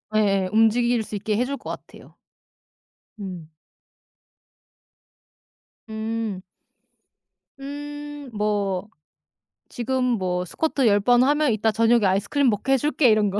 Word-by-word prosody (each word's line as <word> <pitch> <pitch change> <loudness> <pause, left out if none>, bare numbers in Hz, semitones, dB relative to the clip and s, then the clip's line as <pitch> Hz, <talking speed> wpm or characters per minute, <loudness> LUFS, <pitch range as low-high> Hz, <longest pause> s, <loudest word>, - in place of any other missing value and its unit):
예예 195 -3 +2
움직일 225 +2 +3
수 215 - -7
있게 210 +1 -1
해줄 260 +3 -1
것 - - -9
같아요. - - -10 1.0
음. 180 -5 -7 2.4
음. 220 -2 -3 1.2
음 290 0 -7
뭐 205 -2 -1 0.8
"지금 255 +2 -2
뭐 185 -7 0
스쿼트 280 - -1
10 205 -1 +4
번 245 +4 +4
하면 295 0 +2
이따 220 0 +1
저녁에 225 0 +3
아이스크림 220 +8 +2
먹게 230 +6 0
해 - - +5
줄게." 295 -1 +2
이런 215 -2 +3
거. 200 +1 -2
225 Hz, 200 characters per minute, -23 LUFS, 205-260 Hz, 2.4 s, 해